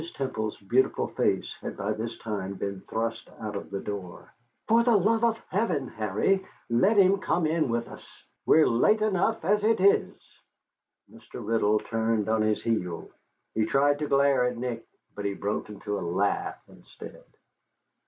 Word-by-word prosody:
Temple's 110 -6 -3
beautiful 120 +7 +1
face - - 0
had - - -6
by 105 +2 -1
this 115 +2 -5
time 100 -3 -4
been 100 0 -4
thrust 115 0 -3
out 105 -2 -5
of 100 - -6
the 100 - -4
door. 95 -4 -7 0.3
"For 230 +1 +5
the 235 -1 +4
love 220 +4 +2
of 230 -1 +3
heaven, 185 - 0
Harry, 110 - 0 0.3
let 195 - +3
him 195 0 +5
come 175 -2 0
in 155 -3 +1
with 115 0 -1
us. - - -12 0.3
We're 160 - +5
late 210 - +3
enough 215 -1 0
as 205 +3 +2
it 225 0 +3
is." 200 +2 +3 0.9
Mr. - - -11
Riddle 110 -2 +2
turned 115 -2 -1
on 110 0 +2
his 110 0 0
heel. 90 -7 -2 0.4
He 110 - +1
tried 145 +2 +2
to 150 - -2
glare 140 -2 +3
at 125 -1 -2
Nick, 120 -1 -4 0.3
but 100 - -6
he 100 -1 -1
broke 105 +2 -3
into 105 0 -4
a - - -6
laugh 95 +4 -1
instead. - - -13
115 Hz, 165 wpm, -27 LUFS, -, 0.9 s, For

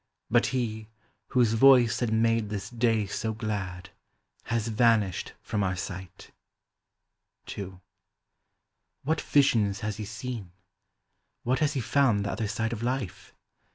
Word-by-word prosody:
But 120 +1 +4
he, 110 -4 -2 0.4
whose 120 -4 +3
voice 125 0 +6
had 120 -3 0
made 115 -1 +2
this 105 0 -5
day 115 -3 +1
so 110 +3 -3
glad, 95 -5 -4 0.5
Has 115 -1 -1
vanished 110 -4 +2
from 105 - -2
our 95 -1 0
sight. 95 -1 -7 1.2
II. 95 -2 -7 1.2
What 155 +3 0
visions 115 -8 +2
has 105 -1 -3
he 110 - -5
seen? 110 -3 -6 0.9
What 125 +2 +1
has 150 -2 +1
he 135 - -1
found 115 -4 +2
the 100 - -1
other 110 - -2
side 115 +2 -2
of 110 - -5
life 125 -5 -4
110 Hz, 130 wpm, -28 LUFS, 100-120 Hz, 1.2 s, voice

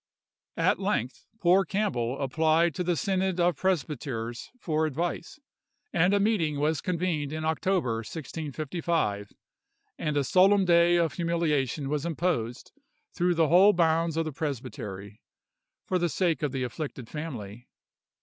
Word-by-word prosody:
At - - +2
length 125 +3 -2
poor 185 +2 +4
Cambell 140 - -1
applied 160 +4 +2
to 180 - -2
the 175 0 +1
synod 190 0 0
of 175 -1 +3
presbyters 135 -9 -2
for 155 -5 0
advice; 170 - -4 0.5
and 180 +3 +3
a 200 - +3
meeting 180 -9 +1
was 150 +1 +1
convened 170 -5 -1
in 155 0 -4
October, 160 -6 0
1655, 155 - -3 0.7
and 150 -1 -1
a 145 - +2
solemn 190 +6 +4
day 170 0 +5
of 170 -3 +1
humiliation 155 -5 0
was 145 0 -1
imposed 160 -8 -2 0.4
through 175 0 +1
the 160 -2 +3
whole 190 +5 +7
bounds 165 -2 +2
of 165 - +1
the 155 - -3
presbytery, 110 -8 -6 0.6
for 185 - 0
the 175 0 +1
sake 165 -4 0
of 150 -3 -1
the 130 -1 -2
afflicted 125 0 -5
family. 120 -7 -7
160 Hz, 140 wpm, -27 LUFS, 135-175 Hz, 0.7 s, whole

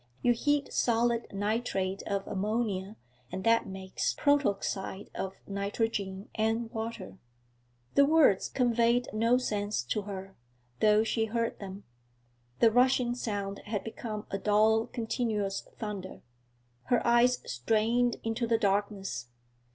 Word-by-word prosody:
You 245 - +5
heat 290 +4 0
solid 235 0 +1
nitrate 200 -2 -1
of 200 -1 -1
ammonia, 205 -1 -2 0.4
and 190 - -4
that 230 0 +3
makes 190 0 -3
protoxide 205 -8 0
of 190 0 -4
nitrogen 200 -1 -2
and 225 +1 0
water.' 220 -4 -5 0.7
The 280 - +6
words 305 -11 +4
conveyed 240 0 +2
no 230 +3 +3
sense 210 - -1
to 165 - -1
her, 195 -1 -7 0.4
though 215 0 +5
she 225 0 0
heard 230 +1 -2
them. 195 0 -8 0.8
The 230 - +7
rushing 250 0 +3
sound 205 -5 -3
had 210 -2 -3
become 220 -1 -5
a 195 - -2
dull 215 +2 +3
continuous 220 -4 -2 0.2
thunder. 205 -4 -6 0.6
Her 245 - +1
eyes 240 +1 +5
strained 225 - +1
into 225 +1 -1
the 230 0 +3
darkness. 195 - -1
220 Hz, 120 wpm, -30 LUFS, 195-235 Hz, 0.8 s, The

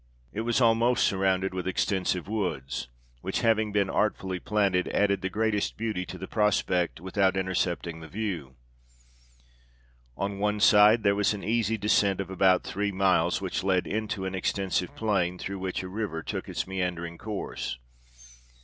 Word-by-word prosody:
It 110 - -2
was 120 +1 +1
almost 120 +1 +4
surrounded 95 -1 +1
with 95 0 -3
extensive 95 -1 0
woods; 90 - -3 0.3
which, - - -2
having 110 -2 +2
been 100 -1 +2
artfully 95 -3 -1
planted, 100 -3 +1
added 100 -2 +1
the 95 - -2
greatest 105 0 0
beauty 105 -5 -2
to 90 - -7
the 95 +1 -7
prospect, 95 -6 +1
without 95 +1 +1
intercepting 90 -3 -1
the 80 - -9
view. 85 -9 -4 1.6
On 100 +1 -3
one 105 +1 0
side 105 +2 +6
there 100 -1 +4
was 105 +1 +1
an 100 - -8
easy 115 0 +1
descent 100 -2 +2
of 95 -1 -4
about 95 0 +3
three 105 +1 -2
miles, 90 -3 +2
which 95 0 -2
led 95 -2 +2
into 105 -2 -3
an 95 - -3
extensive 95 -1 -1
plain, 90 -5 0
through 100 +1 -5
which 95 0 -3
a - - -5
river 95 -4 -4
took - - -5
its - - -2
meandering 90 -3 -3
course. 105 - -4
95 Hz, 160 wpm, -27 LUFS, 90-105 Hz, 1.6 s, side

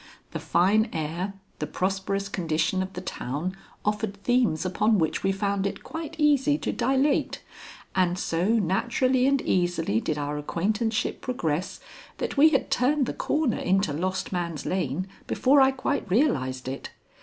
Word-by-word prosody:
The - - -4
fine 205 +6 +3
air, 170 +5 -3 0.2
the 150 - -2
prosperous 195 +3 -1
condition 170 -1 0
of 190 +1 -4
the 180 - -5
town 170 +1 -4 0.3
offered 210 -1 -1
themes 240 -10 +2
upon 210 +4 +2
which 160 -4 0
we 195 - +2
found 200 0 0
it - - -6
quite 320 -1 -6
easy 290 -1 +3
to - - -2
dilate, 270 +2 +1 0.5
and 180 -1 +2
so 170 0 -1
naturally 235 +5 +2
and 275 -1 +2
easily 175 - +1
did 155 - -2
our 145 0 -2
acquaintanceship 210 +9 -1
progress 175 -9 -2 0.4
that - - -3
we 295 +3 +7
had - - 0
turned 270 +3 +2
the - - -3
corner 295 -6 0
into 190 -4 +1
Lost 185 +4 -2
Man's 170 -4 -3
Lane 185 0 -1 0.2
before 275 +2 +4
I 265 - +6
quite 270 -3 -2
realized 130 - +1
it. 135 +1 -5
195 Hz, 155 wpm, -26 LUFS, 170-250 Hz, 0.5 s, we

